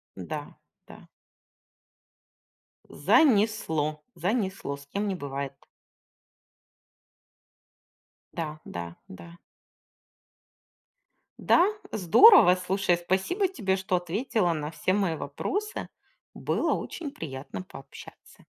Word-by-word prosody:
Да, - - -6 0.3
да. - - -14 1.8
Занесло, 200 - +2
занесло, 190 - -2
с 140 0 -16
кем 200 +7 -2
не 195 - -1
бывает? 140 -3 -5 2.8
Да, 155 -2 -4
да, 85 -1 -6 0.2
да. 170 - -12 2.0
Да, 345 - +5 0.3
здорово! 205 - +7
Слушай, 185 -1 0
спасибо 190 - 0
тебе, 210 - -1
что 190 0 -1
ответила 185 +2 0
на 150 -1 -4
все 165 +4 -1
мои 195 -5 +1
вопросы. 400 - -4 0.5
Было - - 0
очень 310 -5 -5
приятно 140 - -7
пообщаться. 135 -7 -14
180 Hz, 85 wpm, -27 LUFS, 155-215 Hz, 2.8 s, здорово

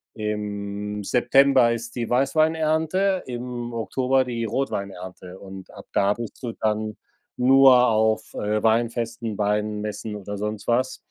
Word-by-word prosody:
im 105 -1 -4
September 125 +2 +4
ist 115 +1 -6
die 120 -2 -3
Weißweinernte, 160 +7 +1
im 120 -1 -5
Oktober 130 +3 +1
die 115 -2 -3
Rotweinernte 95 -6 -4
und 95 -1 -10
ab - - -12
da 100 +1 +3
bist 120 -2 -8
du 120 -3 -4
dann 110 0 -2 0.4
nur 130 0 +6
auf, 110 -1 +1
äh, 105 +1 -1
Weinfesten, 115 -1 0
Weinmessen 105 +1 -2
oder 105 0 -6
sonst 105 0 -4
was. 125 +2 +1
115 Hz, 125 wpm, -24 LUFS, 105-125 Hz, 0.4 s, nur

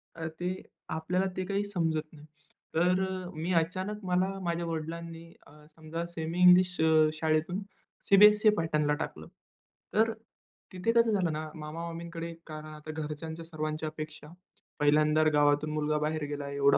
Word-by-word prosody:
अ, 165 -1 -4
ते 180 +1 -2 0.3
आपल्याला 180 +4 0
ते 185 - -1
काही 200 +2 0
समजत 165 -6 0
नाही. 150 -1 -13 0.5
तर 180 +3 +3
अ, 185 -1 -4
मी 165 +4 -2
अचानक 185 +5 -1
मला 185 +2 +1
माझ्या 170 -1 -1
वडिलांनी 165 +1 -5 0.2
अ, - - -17 0.2
समजा 165 +1 -5
सेमी 165 +2 -3
इंग्लिश 180 0 +6
अ, 160 -1 +5
शाळेतून 160 +4 0 0.5
सीबीएससी 210 +2 +7
पॅटर्नला 150 -3 +1
टाकलं. - - -8 0.7
तर 220 +2 +4
अ, - - -5 0.6
तिथे 185 +5 0
कसं 230 -1 +4
झालं 180 -6 +1
ना, 155 +1 -4
मामा-मामींकडे 165 +2 -6
कारण 155 -1 -7
आता 155 0 -8
घरच्यांच्या 160 +1 -6
सर्वांच्या 155 -1 -3
अपेक्षा 155 -1 -8 0.5
पहिल्यांदा 150 +1 +4
गावातून 145 +1 +3
मुलगा 150 0 0
बाहेर 155 +1 -1
गेला 145 -1 -4
एवढा 140 0 +4
165 Hz, 145 wpm, -30 LUFS, 155-180 Hz, 0.7 s, सीबीएससी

